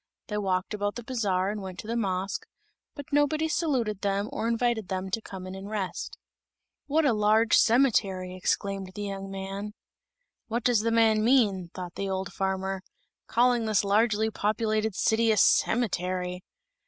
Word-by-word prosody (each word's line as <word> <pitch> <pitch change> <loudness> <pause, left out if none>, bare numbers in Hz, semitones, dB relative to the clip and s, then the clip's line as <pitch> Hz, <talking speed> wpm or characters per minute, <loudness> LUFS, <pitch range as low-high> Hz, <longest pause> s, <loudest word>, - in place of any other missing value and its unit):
They 210 - -2
walked 185 0 -1
about 205 0 -2
the 240 - -6
bazaar 200 -6 0
and 210 -1 -5
went 190 -2 -7
to - - -16
the 230 - -2
mosque, 195 -3 -2 0.5
but 285 -1 -9
nobody 305 +2 +2
saluted 255 - 0
them 200 +1 0
or 225 - -2
invited 235 -3 0
them 190 0 -3
to 225 - -1
come 190 -3 -8
in 185 - -7
and 195 +1 -8
rest. 205 -4 -4 0.7
"What 310 +2 +2
a 265 - +4
large 215 +2 +3
cemetery!" 205 -7 +3
exclaimed 195 0 -2
the 205 - -4
young 195 -1 -5
man. 195 +2 -6 0.7
"What 235 +1 -2
does 245 -3 +3
the 225 +2 0
man 225 -1 +3
mean," 210 -8 +3
thought 180 -2 -6
the 195 0 -3
old 190 0 -3
farmer, 190 0 -2 0.5
"calling 240 -1 +3
this 215 -2 +2
largely 215 +2 +2
populated 215 0 0
city 225 +2 +2
a 215 - +2
cemetery?" 180 -7 +1
210 Hz, 165 wpm, -27 LUFS, 190-230 Hz, 0.7 s, a